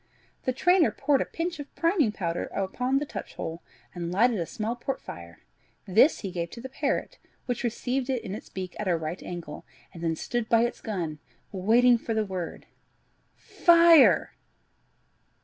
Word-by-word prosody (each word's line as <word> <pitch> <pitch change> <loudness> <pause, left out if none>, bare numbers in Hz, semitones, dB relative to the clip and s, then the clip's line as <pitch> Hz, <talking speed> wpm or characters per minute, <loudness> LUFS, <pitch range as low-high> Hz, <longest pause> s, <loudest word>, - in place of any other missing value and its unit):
The 255 - +2
trainer 355 +6 +4
poured 285 -3 +1
a - - 0
pinch 335 -1 -4
of 285 - -9
priming 330 - +2
powder 170 -4 -3
upon 250 +7 -1
the 290 - -1
touch - - -8
hole, 165 +1 -5 0.3
and 170 -1 -4
lighted 225 +3 +3
a 170 - -2
small 225 0 -3
port 265 +2 -4
fire; 85 -4 -11 0.4
this 220 - +4
he 195 - -4
gave 170 -2 -3
to 235 - -10
the 260 +3 -7
parrot, 275 +1 -2 0.3
which 245 -2 -3
received 250 +2 -2
it 255 -3 -1
in 190 - -5
its 220 +7 -8
beak 185 -1 -6
at 210 - -3
a 175 -2 +2
right 160 +2 -5
angle, 170 -4 -7 0.3
and 170 - -9
then 165 -1 0
stood 240 +6 -3
by 230 0 +5
its 240 - -2
gun, 170 -9 -4 0.3
waiting 230 +5 +4
for 225 -1 -3
the 220 -1 +1
word. 185 -3 -5 0.7
"Fire!" 335 -3 +5
225 Hz, 175 wpm, -27 LUFS, 180-265 Hz, 0.7 s, by